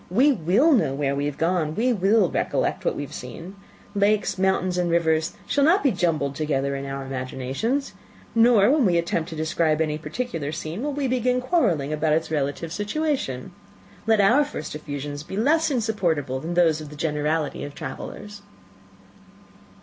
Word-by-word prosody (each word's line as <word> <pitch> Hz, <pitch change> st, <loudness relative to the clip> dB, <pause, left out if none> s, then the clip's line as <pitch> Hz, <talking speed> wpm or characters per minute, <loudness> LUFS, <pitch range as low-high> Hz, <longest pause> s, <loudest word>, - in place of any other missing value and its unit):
We 255 Hz, +11 st, +4 dB
will 210 Hz, -, +3 dB
know 215 Hz, -, +3 dB
where 140 Hz, -1 st, 0 dB
we 140 Hz, +1 st, -1 dB
have 145 Hz, -, -5 dB
gone 165 Hz, -2 st, 0 dB
we 245 Hz, +4 st, +2 dB
will 200 Hz, 0 st, +3 dB
recollect -, -, -1 dB
what -, -, 0 dB
we -, -, -3 dB
have 140 Hz, -, -9 dB
seen. 165 Hz, -, -8 dB, 0.4 s
Lakes, 205 Hz, -1 st, +1 dB
mountains, 185 Hz, -1 st, +1 dB
and 175 Hz, -1 st, 0 dB
rivers, 160 Hz, -1 st, +1 dB
shall 285 Hz, -, +1 dB
not 350 Hz, +7 st, +4 dB
be 275 Hz, -, +4 dB
jumbled 155 Hz, -8 st, 0 dB
together 140 Hz, -2 st, -1 dB
in 140 Hz, 0 st, -5 dB
our 135 Hz, 0 st, -5 dB
imaginations; 135 Hz, -, -3 dB, 0.4 s
nor, 230 Hz, -1 st, +5 dB
when 295 Hz, -2 st, +3 dB
we 180 Hz, -5 st, +3 dB
attempt 170 Hz, 0 st, -1 dB
to 160 Hz, -, -7 dB
describe 160 Hz, 0 st, 0 dB
any 155 Hz, -1 st, 0 dB
particular 160 Hz, -, -4 dB
scene, 160 Hz, +4 st, -5 dB
will 295 Hz, +2 st, -1 dB
we 280 Hz, -1 st, -1 dB
begin 250 Hz, 0 st, +1 dB
quarrelling 210 Hz, -, +1 dB
about 155 Hz, 0 st, +1 dB
its 160 Hz, +1 st, 0 dB
relative 150 Hz, +2 st, -2 dB
situation. 205 Hz, -, -2 dB, 0.6 s
Let 220 Hz, -1 st, +4 dB
our 235 Hz, +9 st, +5 dB
first 285 Hz, -, -6 dB
effusions 145 Hz, -1 st, -5 dB
be 190 Hz, +6 st, -7 dB
less 315 Hz, +9 st, +3 dB
insupportable 175 Hz, -, 0 dB
than 165 Hz, +5 st, -4 dB
those 165 Hz, -3 st, +3 dB
of 150 Hz, -, -8 dB
the 150 Hz, -, -10 dB
generality 150 Hz, 0 st, -1 dB
of 145 Hz, 0 st, -7 dB
travellers." 205 Hz, +9 st, -7 dB
170 Hz, 175 wpm, -24 LUFS, 150-225 Hz, 0.6 s, nor